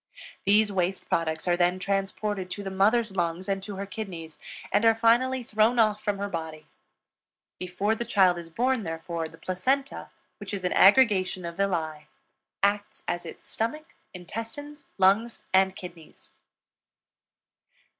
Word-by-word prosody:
These 210 Hz, +1 st, +4 dB
waste 185 Hz, 0 st, -1 dB
products 160 Hz, +1 st, -1 dB
are 175 Hz, -, +3 dB
then 175 Hz, +1 st, +2 dB
transported 195 Hz, 0 st, -2 dB
to 200 Hz, +2 st, -5 dB
the 195 Hz, -, -5 dB
mother's 210 Hz, +2 st, +2 dB
lungs 175 Hz, +1 st, -1 dB
and 195 Hz, -1 st, -1 dB
to 200 Hz, +1 st, -7 dB
her 195 Hz, +1 st, -4 dB
kidneys, 175 Hz, -7 st, -7 dB, 0.3 s
and 210 Hz, -, +3 dB
are 225 Hz, -1 st, +5 dB
finally 240 Hz, +3 st, +3 dB
thrown 220 Hz, +2 st, +2 dB
off 215 Hz, -2 st, +3 dB
from 205 Hz, -1 st, -1 dB
her 200 Hz, +1 st, -3 dB
body. 160 Hz, -4 st, -6 dB, 0.9 s
Before 185 Hz, +4 st, -1 dB
the 225 Hz, -, -3 dB
child 190 Hz, -6 st, +3 dB
is 170 Hz, -1 st, -10 dB
born, 250 Hz, +7 st, 0 dB
therefore, 165 Hz, -1 st, -4 dB
the 165 Hz, -, -15 dB
placenta, 260 Hz, +12 st, -2 dB, 0.3 s
which 205 Hz, -1 st, -5 dB
is 190 Hz, -, -6 dB
an 180 Hz, -, 0 dB
aggregation 195 Hz, -5 st, +4 dB
of 170 Hz, 0 st, -6 dB
villi, 160 Hz, -6 st, -2 dB, 0.6 s
acts 205 Hz, +1 st, 0 dB
as 175 Hz, 0 st, -3 dB
its -, -, -11 dB
stomach, 305 Hz, +9 st, -3 dB, 0.2 s
intestines, 230 Hz, +11 st, -8 dB
lungs, 200 Hz, +5 st, +2 dB
and 190 Hz, 0 st, +4 dB
kidneys. 170 Hz, -4 st, -12 dB
195 Hz, 145 wpm, -27 LUFS, 175-220 Hz, 0.9 s, are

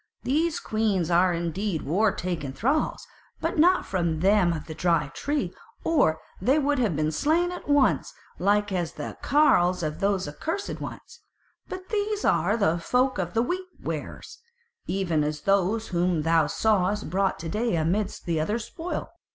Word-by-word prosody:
These 315 Hz, +5 st, +1 dB
queens 205 Hz, -6 st, 0 dB
are 180 Hz, +2 st, +4 dB
indeed 170 Hz, +1 st, -2 dB
war 200 Hz, +8 st, +2 dB
taken 170 Hz, -8 st, -4 dB
thralls, 275 Hz, -, 0 dB, 0.3 s
but -, -, -2 dB
not 360 Hz, +4 st, +5 dB
from 170 Hz, -4 st, -1 dB
them 195 Hz, -2 st, +4 dB
of 160 Hz, -3 st, -4 dB
the 160 Hz, -, -7 dB
Dry 160 Hz, -4 st, +1 dB
Tree, 290 Hz, 0 st, -2 dB, 0.3 s
or 280 Hz, -, +2 dB, 0.2 s
they 260 Hz, +9 st, +3 dB
would 290 Hz, -2 st, +1 dB
have 215 Hz, -10 st, +1 dB
been 155 Hz, +1 st, 0 dB
slain 325 Hz, -, +1 dB
at 355 Hz, -4 st, -8 dB
once, 285 Hz, -2 st, +3 dB, 0.3 s
like 205 Hz, +2 st, +2 dB
as 175 Hz, -3 st, -2 dB
the -, -, -6 dB
carles 180 Hz, -, +3 dB
of 155 Hz, -1 st, -3 dB
those 195 Hz, -4 st, 0 dB
accursed 325 Hz, -, -4 dB
ones. 475 Hz, +1 st, -8 dB, 0.5 s
But 370 Hz, 0 st, -7 dB
these 420 Hz, -1 st, -1 dB
are 195 Hz, +4 st, +3 dB
of 225 Hz, -, -2 dB
the 170 Hz, -2 st, +2 dB
folk 250 Hz, +6 st, +1 dB
of 175 Hz, -1 st, -3 dB
the 230 Hz, -, +3 dB
Wheat 365 Hz, +8 st, -3 dB
wearers, -, -, -6 dB, 0.5 s
even 170 Hz, -6 st, 0 dB
as 150 Hz, 0 st, -3 dB
those 200 Hz, +3 st, +1 dB
whom 175 Hz, -3 st, +1 dB
thou 165 Hz, -1 st, +3 dB
sawest 205 Hz, +1 st, +1 dB
brought 195 Hz, +1 st, +1 dB
to 165 Hz, -, -6 dB
day 220 Hz, +2 st, 0 dB
amidst 175 Hz, +6 st, -1 dB
the 165 Hz, -3 st, 0 dB
other 210 Hz, +9 st, 0 dB
spoil. 325 Hz, +8 st, -5 dB
195 Hz, 165 wpm, -26 LUFS, 170-270 Hz, 0.5 s, not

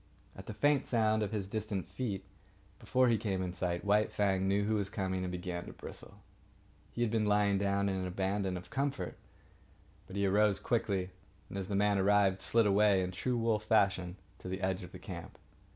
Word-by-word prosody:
At 95 Hz, -, -11 dB
the 110 Hz, -, -5 dB
faint 145 Hz, +1 st, +2 dB
sound 110 Hz, -2 st, +2 dB
of 105 Hz, -, -1 dB
his 105 Hz, -3 st, -2 dB
distant 105 Hz, -3 st, -3 dB
feet, 95 Hz, +1 st, -4 dB, 0.6 s
before 130 Hz, 0 st, +2 dB
he 115 Hz, -3 st, +3 dB
came 95 Hz, -3 st, -1 dB
in 90 Hz, -1 st, -3 dB
sight, 90 Hz, 0 st, -2 dB
White 105 Hz, +1 st, +3 dB
Fang 95 Hz, -2 st, +1 dB
knew 100 Hz, +1 st, +2 dB
who 110 Hz, +2 st, 0 dB
was 100 Hz, -2 st, 0 dB
coming 95 Hz, -3 st, -2 dB
and 90 Hz, -1 st, -3 dB
began 90 Hz, -1 st, -4 dB
to -, -, -8 dB
bristle. -, -, -8 dB, 0.7 s
He 120 Hz, -, -1 dB
had 115 Hz, -, 0 dB
been 110 Hz, -2 st, +1 dB
lying 105 Hz, -1 st, +3 dB
down 100 Hz, 0 st, +1 dB
in 95 Hz, -1 st, 0 dB
an 95 Hz, -1 st, -2 dB
abandon 95 Hz, 0 st, -1 dB
of 90 Hz, 0 st, -11 dB
comfort, 140 Hz, +1 st, -2 dB, 0.9 s
but 95 Hz, -, -9 dB
he 100 Hz, 0 st, +1 dB
arose 100 Hz, +1 st, +3 dB
quickly, 95 Hz, -5 st, -1 dB, 0.4 s
and, -, -, -6 dB
as 95 Hz, -, -3 dB
the 100 Hz, -, -2 dB
man 100 Hz, 0 st, +3 dB
arrived, 100 Hz, -1 st, +3 dB
slid 115 Hz, -1 st, +3 dB
away 100 Hz, -1 st, +4 dB
in 90 Hz, -, -3 dB
true 120 Hz, +7 st, -1 dB
wolf 115 Hz, -2 st, 0 dB
fashion 95 Hz, -5 st, +2 dB, 0.2 s
to -, -, -9 dB
the 95 Hz, +1 st, -4 dB
edge 95 Hz, +1 st, 0 dB
of 90 Hz, -, -9 dB
the -, -, -9 dB
camp. -, -, -8 dB
100 Hz, 205 wpm, -33 LUFS, 95-105 Hz, 0.9 s, away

